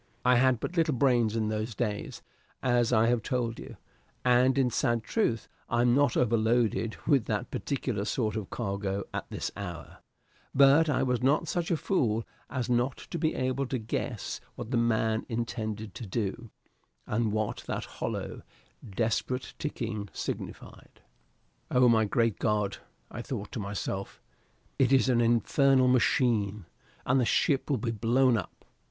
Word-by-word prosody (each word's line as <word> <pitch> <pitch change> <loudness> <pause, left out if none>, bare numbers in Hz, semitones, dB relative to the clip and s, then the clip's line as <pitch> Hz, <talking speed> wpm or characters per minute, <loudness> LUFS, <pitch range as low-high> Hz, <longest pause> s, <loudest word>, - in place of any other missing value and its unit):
I 125 0 +5
had 130 -1 +3
but 175 - -5
little 160 -4 +2
brains 120 -4 +2
in 110 -2 0
those 110 +1 -3
days, 105 -2 -3 0.4
as 120 -2 +2
I 110 -1 +4
have 120 0 +2
told 120 -2 -2
you, - - -10 0.5
and 125 +2 +4
in 130 -2 +2
sad 120 -1 +1
truth 115 - 0 0.2
I 120 0 +2
am 120 0 +4
not 140 -1 +3
overloaded 115 -1 +2
with 140 -7 +3
that 105 -2 -2
particular 125 -7 -2
sort 110 -2 -1
of 105 -4 -4
cargo 100 -3 -2
at - - -4
this - - -4
hour; 90 -4 -7 0.6
but 140 +4 +6
I 145 - +2
was 125 -2 0
not 145 +5 +2
such 170 +1 -1
a 170 - +2
fool 120 - 0 0.2
as 130 -3 -2
not 125 +2 +1
to 170 - -3
be 160 -1 0
able 130 +1 -1
to 130 - -1
guess 110 -1 -4
what 110 - -7
the 125 - +2
man 110 -1 +1
intended 110 -2 -3
to 115 - -7
do, 110 +3 -3 0.6
and 110 0 0
what 110 0 -1
that - - -3
hollow, - - -5 0.5
desperate 120 +3 -1
ticking 110 -9 -4
signified. - - -7 0.7
Oh, 125 0 +4
my 110 -2 +4
great 115 -1 +1
God, 105 -2 0 0.3
I 120 - -5
thought 115 -5 -5
to - - -4
myself, 100 -1 -4 0.6
it 130 -2 +4
is 135 -1 +4
an 120 -2 +3
infernal 130 +3 +3
machine! 110 -5 +2 0.4
and 130 +2 +3
the - - +3
ship 135 +4 +1
will 140 - +2
be 115 +1 -2
blown 120 +3 +3
up! 100 -6 -5
120 Hz, 160 wpm, -29 LUFS, 110-130 Hz, 0.7 s, but